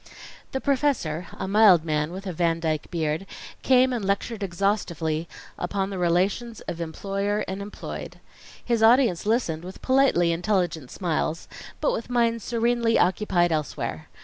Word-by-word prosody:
The 265 - -2
professor, 260 - 0
a - - -5
mild 195 -5 +6
man 150 0 0
with 190 +2 -7
a 185 - -3
Van 165 0 +1
Dyke 155 -2 -2
beard, 160 +2 -2 0.3
came 255 0 +4
and 235 -4 -2
lectured 200 +3 -1
exhaustively 170 -4 -1 0.3
upon 195 +2 -2
the 190 - -4
relations 190 +7 0
of 170 - -6
employer 195 +5 -2
and 190 +1 -4
employed. 205 +1 -7 0.5
His 235 -2 +1
audience 225 -5 +4
listened 195 -9 0
with 185 +1 -10
politely 260 -11 +3
intelligent 175 -5 -1
smiles, 165 -2 -2 0.3
but - - +1
with - - -4
minds 230 -2 +1
serenely 235 -1 +1
occupied 180 -2 +2
elsewhere. 155 -3 -3
195 Hz, 145 wpm, -25 LUFS, 170-230 Hz, 0.5 s, mild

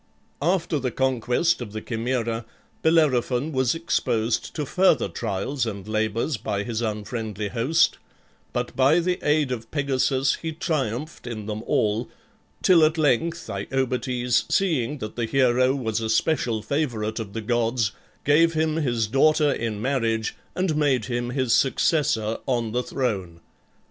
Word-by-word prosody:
After 170 -1 +1
the 130 -1 -1
conquest 130 +5 +1
of 105 -4 -7
the 110 - -3
Chimaera 115 0 -2 0.4
Bellerophon 150 -3 +2
was 130 -2 +1
exposed 120 -9 0
to 150 - -2
further 185 - +3
trials 100 - -2
and 100 -2 -6
labors 110 +5 -1
by 100 -1 -2
his 115 0 -3
unfriendly 105 -1 -3
host, 130 +10 +2 0.5
but 125 0 -3
by 135 +5 +4
the 180 +1 0
aid 150 -2 +2
of 115 -2 -4
Pegasus 135 -2 +1
he 160 -1 -3
triumphed 150 -3 -3
in 110 -3 -5
them 105 0 -4
all, 110 +3 +1 0.5
till 175 -4 +6
at 155 +1 +3
length 160 +3 +1
Iobates, 125 +2 -1
seeing 150 -8 +1
that 110 -5 -6
the 120 - 0
hero 130 +1 +3
was 115 -4 -2
a 110 - -2
special 115 -2 +1
favorite 115 -6 -1
of 105 -3 -6
the 115 - -3
gods, 115 0 0 0.3
gave 165 +3 +4
him 155 0 +1
his 120 -7 0
daughter 150 +6 +3
in 110 -5 -2
marriage 115 -3 0 0.2
and 180 -4 0
made 140 -7 +2
him 120 -1 -2
his 130 -2 0
successor 125 -6 +2
on 120 -4 0
the 125 +2 0
throne. 100 -11 -3
125 Hz, 145 wpm, -24 LUFS, 110-150 Hz, 0.5 s, till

